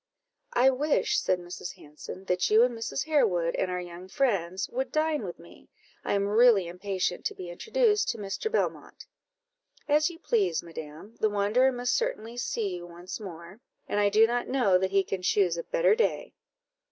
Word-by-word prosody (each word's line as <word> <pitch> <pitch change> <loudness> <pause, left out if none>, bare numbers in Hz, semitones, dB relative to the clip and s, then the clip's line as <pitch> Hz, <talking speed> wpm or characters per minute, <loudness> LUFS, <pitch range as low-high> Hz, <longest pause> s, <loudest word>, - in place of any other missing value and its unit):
"I 260 +2 +5
wish," 290 +4 +1
said 185 - +1
Mrs. 175 0 -8
Hanson, 150 +5 -11
"that 180 -1 +1
you 220 +2 +6
and 245 -1 +1
Mrs. 230 +4 -3
Harewood 205 - +2
and 185 - -1
our 180 0 -2
young 175 +1 -9
friends 190 -6 0
would 260 +2 -3
dine 310 -2 +1
with 180 -5 -6
me: 170 - -17 0.3
I - - -1
am 200 0 +1
really 215 -2 +5
impatient 180 +1 -3
to - - -2
be 180 -2 -7
introduced 445 - +1
to 230 - -2
Mr. 205 - -4
Belmont." - - -2 0.8
"As 300 +3 +3
you 340 - -10
please, 200 - 0
madam; 165 +5 -10
the 215 - +2
wanderer 210 +6 +2
must 245 -1 -1
certainly 465 - -2
see 210 -6 -2
you 175 0 -9
once 175 +4 -8
more, 180 +1 -10 0.3
and 205 - -1
I 205 0 +4
do 215 +2 +6
not 240 +1 -1
know 210 -9 +3
that 190 0 0
he 195 0 +3
can 190 -1 -4
choose 180 -2 +2
a 170 - -3
better - - +3
day." 460 +2 0
205 Hz, 185 wpm, -28 LUFS, 180-250 Hz, 0.8 s, you